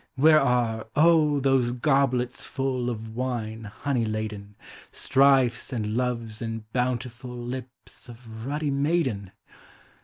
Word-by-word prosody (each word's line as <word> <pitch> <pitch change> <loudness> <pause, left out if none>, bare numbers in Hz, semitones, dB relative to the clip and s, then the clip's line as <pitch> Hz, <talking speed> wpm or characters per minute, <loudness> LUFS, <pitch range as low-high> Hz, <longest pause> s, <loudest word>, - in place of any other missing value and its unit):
Where 155 +3 +6
are, 120 -4 +1
oh! 155 -2 +4
those 130 -3 +2
goblets 130 -2 +1
full 130 -2 -2
Of 110 -1 -6
wine 115 -3 -3
honey 120 +4 -2
laden. 110 -2 -4 0.4
Strifes 135 -3 +3
and 110 -3 -2
loves 115 -3 -2
and 115 -1 -4
bountiful 125 0 -2
Lips 125 +1 -8
of 115 -2 -10
ruddy 145 +1 -1
maiden? 140 - 0
125 Hz, 115 wpm, -26 LUFS, 115-135 Hz, 0.4 s, Where